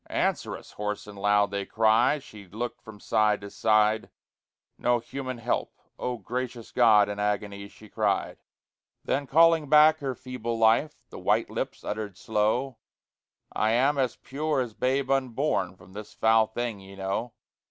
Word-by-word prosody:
"Answer - - -1
us!" - - -15
hoarse 105 0 -4
and 105 -1 -11
loud 100 0 +2
they 100 0 -2
cry; 115 +7 +3
She 105 -8 -13
looked 115 +6 -5
from 110 -2 -12
side 105 0 +2
to 100 0 -9
side 110 0 +2 0.7
No 120 0 +2
human 130 +2 -6
help 115 - -2 0.2
"Oh, 125 -1 -2
gracious 120 +2 -5
God!" 110 -4 +5
In 105 0 -5
agony 100 -1 -2
she 110 +1 -16
cried. - - -1 0.7
Then, 140 0 -1
calling 165 0 +4
back 155 +1 +6
her 135 -3 -3
feeble 120 -3 -5
life, 115 +7 +2
The - - -8
white - - +1
lips - - -4
uttered 105 -3 -5
slow, 110 +5 -1 0.7
"I 110 +1 +1
am 135 +4 +2
as 130 -2 0
pure 150 +1 -2
as 120 -4 -2
babe 130 +3 0
unborn 130 - 0
From 95 - -18
this 105 +1 -9
foul 110 0 +4
thing, 115 -1 -4
ye 95 0 -13
know. 100 +5 -3
110 Hz, 160 wpm, -27 LUFS, 105-130 Hz, 0.7 s, back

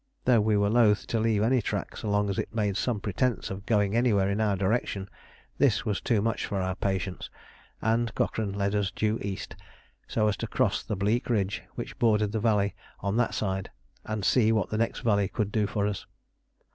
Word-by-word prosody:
Though 120 -4 +5
we 105 0 +2
were 100 0 +2
loth 110 -3 +4
to 115 - -1
leave 110 -2 +2
any 125 +2 +3
track - - -3
so 105 - -4
long 105 0 +2
as 95 - -2
it - - -4
made 105 -3 0
some 115 +1 0
pretence 110 +5 -1
of 95 +2 -7
going 105 -2 +2
anywhere 105 -5 +3
in 105 +2 0
our 105 -2 +2
direction, 100 0 -1 0.5
this 125 -4 +3
was 105 -4 -1
too 110 -4 +1
much 115 0 -1
for 100 - -2
our 95 0 -1
patience, 95 -1 -3 0.5
and 115 +1 +1
Cochrane 105 -3 -1
led 100 0 -1
us 105 -2 +1
due 110 +1 -1
east, 100 -1 -5 0.5
so 110 -1 +1
as 105 - +1
to - - -4
cross - - +1
the 105 - -3
bleak 105 +7 0
ridge 105 -4 0
which - - -6
bordered 105 -3 +3
the 110 - -1
valley 105 -2 +2 0.3
on 100 +2 -1
that 120 - +1
side 95 -2 -2 0.3
and 110 -2 -3
see 110 +4 +4
what 110 -4 0
the 110 - 0
next 115 - -1
valley 100 -3 +2
could 105 0 -2
do 105 -2 +1
for 100 0 -1
us. 105 -1 -3
105 Hz, 210 wpm, -28 LUFS, 100-115 Hz, 0.5 s, Though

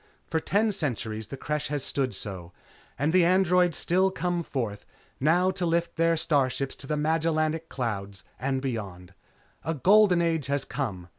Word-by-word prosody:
For 160 - -1
ten 210 +6 +1
centuries 115 - -3
the 135 - -7
Creche 150 +2 -2
has 145 -2 -3
stood 135 -3 -2
so, 90 -4 -7 0.4
and 150 +4 0
the 185 -1 +6
Androids 180 -1 +3
still 185 +2 +2
come 175 -2 -1
forth, 115 -10 -4 0.4
now 175 +6 +3
to 190 -1 -4
lift 170 0 0
their 165 0 +2
starships 135 -4 0
to 135 - -10
the 150 - -1
Magellanic 160 +1 0
Clouds 100 -6 -4 0.2
and 135 +1 -1
beyond. 95 -8 -5 0.5
A 160 - -2
Golden 190 +4 +5
Age 165 -4 0
has 140 0 -1
come. 110 -11 -4
150 Hz, 160 wpm, -27 LUFS, 130-170 Hz, 0.5 s, the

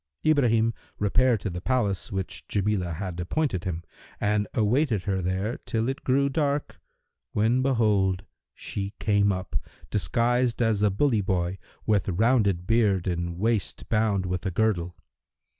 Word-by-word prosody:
Ibrahim 115 -7 +3 0.2
repaired 115 +2 +2
to 100 - -3
the 90 +1 -5
place 105 -5 0
which 95 -1 -4
Jamilah 100 -4 0
had 90 -1 -5
appointed 100 - -1
him 85 -2 -3 0.4
and 105 0 +1
awaited 115 - +2
her 95 -2 -1
there 95 +6 -2
till 115 0 0
it 135 - -4
grew 140 +2 +3
dark, 145 0 -1 0.5
when, 115 +5 +2
behold, 105 -7 +2 0.3
she 100 0 -5
came 100 -1 +2
up, 90 -6 -4 0.4
disguised 120 +3 +1
as 115 -3 +2
a 105 - +4
bully 110 +2 +2
boy 95 -1 -1 0.3
with 100 -4 +2
rounded 100 -2 +2
beard 105 -4 +2
and 85 -1 -2
waist 110 -1 -1
bound 105 -4 +1
with 90 0 -2
a - - +1
girdle. 90 -3 0
105 Hz, 140 wpm, -26 LUFS, 95-115 Hz, 0.5 s, a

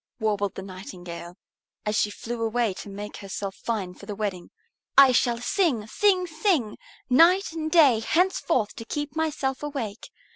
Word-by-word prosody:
warbled 205 -3 0
the 190 - -6
Nightingale, 180 -2 -9 0.5
as 210 0 0
she 210 - +2
flew 230 +3 -6
away 225 -2 +1
to 195 - -9
make 205 +1 -7
herself 195 0 -5
fine 200 -4 -3
for 200 - -14
the 205 - -4
wedding. 195 -4 -4 0.5
"I 275 -2 +9
shall 240 -1 +2
sing, 250 - +1
sing, 370 - +2
sing 315 - 0 0.3
night 335 +10 +5
and 315 -1 -3
day 285 -9 +6
henceforth 330 - +1
to 225 - -7
keep 295 +3 -4
myself 300 -4 -1
awake. 265 -8 -5
230 Hz, 155 wpm, -26 LUFS, 205-305 Hz, 0.5 s, I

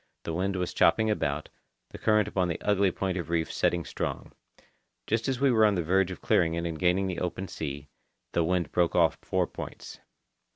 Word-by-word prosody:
The 80 - -4
wind 95 +3 -1
was 90 -1 -2
chopping 110 0 +3
about, 75 -7 -2 0.4
the - - -9
current 105 -2 +3
upon 95 -3 0
the 85 - -3
ugly 100 -2 +3
point 95 0 -2
of 85 - -5
reef 80 -1 -1
setting 85 -2 +1
strong. - - -4 0.7
Just 110 +1 0
as 130 -2 -1
we 135 -1 +4
were 110 -2 +4
on 105 -2 +4
the 85 - 0
verge 95 +3 +2
of 95 - -7
clearing 85 -1 +2
it 85 0 -2
and 80 -2 -4
gaining 90 0 +1
open 90 +2 -3
sea, 70 -3 -6 0.4
the 85 - +1
wind 85 -2 0
broke 85 -1 +1
off 85 -2 +3
four - - 0
points. - - -9
90 Hz, 200 wpm, -28 LUFS, 85-100 Hz, 0.7 s, we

